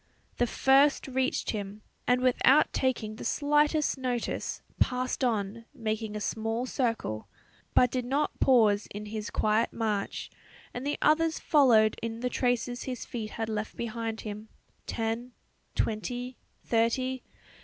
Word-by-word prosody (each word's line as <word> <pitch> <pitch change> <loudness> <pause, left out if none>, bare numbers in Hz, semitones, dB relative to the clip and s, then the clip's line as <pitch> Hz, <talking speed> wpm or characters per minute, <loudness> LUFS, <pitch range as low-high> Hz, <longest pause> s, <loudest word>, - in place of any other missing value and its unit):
The 245 - +2
first 275 +4 +4
reached 265 0 0
him, 205 -1 -5 0.2
and 250 0 +3
without 255 +3 +4
taking 240 -5 0
the - - -7
slightest 295 +2 +2
notice 245 -2 -2 0.2
passed 255 +1 0
on, 225 -1 -1
making 220 -3 -3
a - - -2
small 225 +3 -2
circle, 225 - -2 0.5
but 250 -1 +5
did 250 -2 -1
not 280 +4 -1
pause 215 -6 +4
in 210 +1 -7
his 210 0 -5
quiet 215 +2 +1
march; 215 -3 -2 0.4
and 250 +3 -4
the 290 - 0
others 320 +1 +3
followed 230 -8 +4
in 230 0 -4
the 250 0 -1
traces 245 0 0
his 255 -2 -4
feet 220 -3 -5
had 225 -1 -1
left 215 0 -3
behind 230 -1 -3
him, 215 0 -7 0.4
ten, 230 +2 -3 0.4
twenty, 245 +4 -2 0.3
thirty. 250 +3 +1
235 Hz, 135 wpm, -29 LUFS, 220-255 Hz, 0.5 s, but